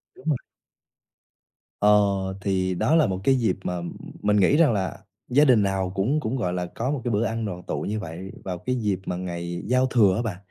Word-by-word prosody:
Đúng -, -, -17 dB
rồi. 145 Hz, -, +2 dB, 1.4 s
Ờ, 105 Hz, -, +4 dB, 0.5 s
thì 95 Hz, -1 st, 0 dB
đó 155 Hz, -, +2 dB
là 160 Hz, -3 st, +4 dB
một 95 Hz, -2 st, -2 dB
cái 135 Hz, +5 st, +4 dB
dịp 115 Hz, -7 st, +1 dB
mà, 90 Hz, -, -2 dB
ừm, 85 Hz, 0 st, -6 dB, 0.3 s
mình 105 Hz, 0 st, +2 dB
nghĩ 100 Hz, +9 st, +4 dB
rằng 155 Hz, -7 st, +5 dB
là 95 Hz, -5 st, -3 dB, 0.2 s
gia 145 Hz, +4 st, +4 dB
đình 120 Hz, -7 st, +5 dB
nào 95 Hz, -2 st, -1 dB
cũng 115 Hz, +11 st, +1 dB
cũng, 125 Hz, -3 st, -2 dB
gọi 90 Hz, -8 st, -1 dB
là, 90 Hz, 0 st, -2 dB
có 125 Hz, +4 st, -1 dB
một 145 Hz, -3 st, -2 dB
cái 120 Hz, -, -1 dB
bữa 105 Hz, +1 st, +1 dB
ăn 115 Hz, 0 st, -2 dB
đoàn 90 Hz, -3 st, -5 dB
tụ -, -, -3 dB
như 110 Hz, +1 st, -2 dB
vậy 90 Hz, +1 st, -7 dB
vào 90 Hz, -2 st, -4 dB
cái 125 Hz, +8 st, -2 dB
dịp 105 Hz, -6 st, -1 dB
mà 90 Hz, -, -2 dB
ngày 85 Hz, -1 st, -5 dB
giao 130 Hz, +2 st, +3 dB
thừa 110 Hz, -7 st, +4 dB
á 110 Hz, -, 0 dB
bạn, 110 Hz, -7 st, -3 dB
105 Hz, 230 wpm, -25 LUFS, 90-125 Hz, 1.4 s, rằng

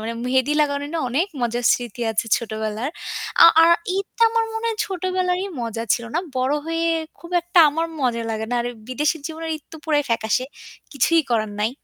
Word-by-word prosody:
মানে 225 Hz, +1 st, -4 dB
মেহেদি 260 Hz, +3 st, +2 dB
লাগানো 285 Hz, -1 st, +1 dB
নিয়ে 330 Hz, -, -1 dB
অনেক 315 Hz, +10 st, +1 dB
মজার 240 Hz, 0 st, -1 dB
স্মৃতি 240 Hz, -1 st, -3 dB
আছে 220 Hz, -, 0 dB
ছোটবেলার। 220 Hz, +3 st, -3 dB, 0.5 s
আ -, -, +11 dB, 0.2 s
আর 335 Hz, -, +6 dB, 0.3 s
ঈদ 395 Hz, -, -1 dB
তো -, -, -18 dB
আমার 455 Hz, 0 st, +1 dB
মনে 445 Hz, +1 st, -4 dB
হয় 445 Hz, -, -2 dB
ছোটবেলারই 370 Hz, 0 st, -1 dB
মজা 230 Hz, -1 st, -3 dB
ছিল, 235 Hz, -, -5 dB
না? -, -, +2 dB, 0.2 s
বড় 260 Hz, +3 st, +1 dB
হয়ে 330 Hz, 0 st, -1 dB, 0.3 s
খুব 340 Hz, -, -12 dB
একটা 350 Hz, +1 st, 0 dB
আমার 325 Hz, +3 st, -1 dB
মজা 240 Hz, -3 st, 0 dB
লাগে 220 Hz, 0 st, -3 dB
না। -, -, +1 dB
আর 240 Hz, -, -3 dB, 0.2 s
বিদেশের 295 Hz, +5 st, +1 dB
জীবনে 325 Hz, 0 st, -6 dB
ঈদ 300 Hz, -, -17 dB
তো 320 Hz, -, -7 dB
পুরাই 295 Hz, -2 st, +2 dB
ফ্যাকাশে। 230 Hz, +2 st, +1 dB, 0.5 s
কিছুই 325 Hz, +5 st, +3 dB
করার 215 Hz, -2 st, +1 dB
নাই 215 Hz, +2 st, +1 dB
285 Hz, 195 wpm, -22 LUFS, 235-335 Hz, 0.5 s, আ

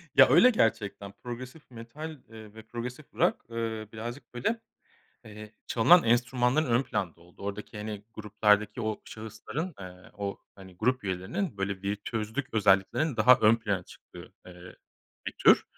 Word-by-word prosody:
Ya -, -, +8 dB
öyle 250 Hz, -, +7 dB
gerçekten. 105 Hz, -, 0 dB
Progresif 125 Hz, +4 st, -8 dB
metal, 120 Hz, +8 st, -8 dB, 0.2 s
eee, 110 Hz, -2 st, -12 dB
ve 110 Hz, 0 st, -11 dB
progresif 120 Hz, +5 st, -7 dB
rock, -, -, +2 dB
eee, 115 Hz, -2 st, -3 dB
birazcık 120 Hz, +3 st, -7 dB
böyle, 175 Hz, -, -1 dB, 0.7 s
eee, 105 Hz, -1 st, -11 dB
çalınan 170 Hz, +10 st, +6 dB
enstrümanların 125 Hz, +5 st, +2 dB
ön 120 Hz, +1 st, +3 dB
planda 90 Hz, -10 st, -3 dB
olduğu. 85 Hz, +3 st, -17 dB
Oradaki 100 Hz, +1 st, -6 dB
hani 105 Hz, -1 st, -6 dB
gruplardaki 105 Hz, +1 st, +1 dB
o 110 Hz, -2 st, -2 dB
şahısların, 110 Hz, -, -6 dB
ııı, 90 Hz, -1 st, -11 dB
o 100 Hz, -1 st, -3 dB, 0.2 s
hani 95 Hz, -2 st, -14 dB
grup 125 Hz, +4 st, 0 dB
üyelerinin 100 Hz, -, -3 dB
böyle 95 Hz, -1 st, -3 dB
bir 100 Hz, +1 st, -1 dB
tözlük 110 Hz, +5 st, -4 dB
özelliklerinin 105 Hz, +8 st, +3 dB
daha 125 Hz, +4 st, +7 dB
ön 110 Hz, +1 st, +6 dB
plana 105 Hz, -5 st, -2 dB
çıktığı, -, -, -14 dB
eee, 90 Hz, 0 st, -12 dB, 0.5 s
bir -, -, -2 dB
tür. -, -, +6 dB
110 Hz, 150 wpm, -29 LUFS, 100-125 Hz, 0.7 s, Ya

